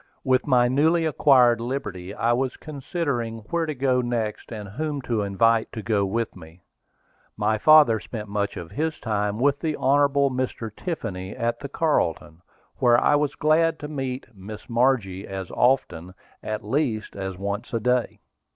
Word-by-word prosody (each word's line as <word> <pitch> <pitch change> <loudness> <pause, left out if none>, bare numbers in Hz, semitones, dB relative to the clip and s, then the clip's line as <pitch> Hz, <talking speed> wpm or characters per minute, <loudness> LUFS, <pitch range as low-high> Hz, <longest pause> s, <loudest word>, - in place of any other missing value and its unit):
With 130 0 +1
my 125 -3 +4
newly 160 +6 +2
acquired 130 -6 +4
liberty 100 -8 -4
I 115 +3 +1
was 130 +1 -1
considering 140 -6 -4
where 170 -1 0
to 155 - -3
go 130 -1 +1
next, 115 -3 -3
and 105 -3 -6
whom 145 +7 -3
to 115 -4 -1
invite 110 +3 +2
to 110 - -6
go 105 -4 +1
with 115 +3 -2
me. 85 0 -14 0.7
My 110 0 +1
father 150 -5 +6
spent 105 +3 -7
much 100 0 -2
of 85 -1 -8
his 160 +1 -2
time 105 -2 -1
with 140 +2 +2
the 155 -2 -2
Hon. 140 +2 +3 0.2
Mr. 125 -4 -4
Tiffany, 105 - -5
at 120 0 -2
the 140 - -7
Carlton, 90 - -1 0.4
where 120 -1 +5
I - - +3
was 145 -1 +1
glad 160 +1 +2
to 150 - -5
meet 135 -3 -4
Miss 105 +2 -10
Margie 115 -6 +1
as 95 -2 -6
often, 95 -9 0 0.3
at 110 -1 -5
least, 115 -3 -1
as 95 -2 -5
once 100 +4 -4
a 115 - -1
day. 125 +2 0
120 Hz, 165 wpm, -24 LUFS, 105-140 Hz, 0.7 s, father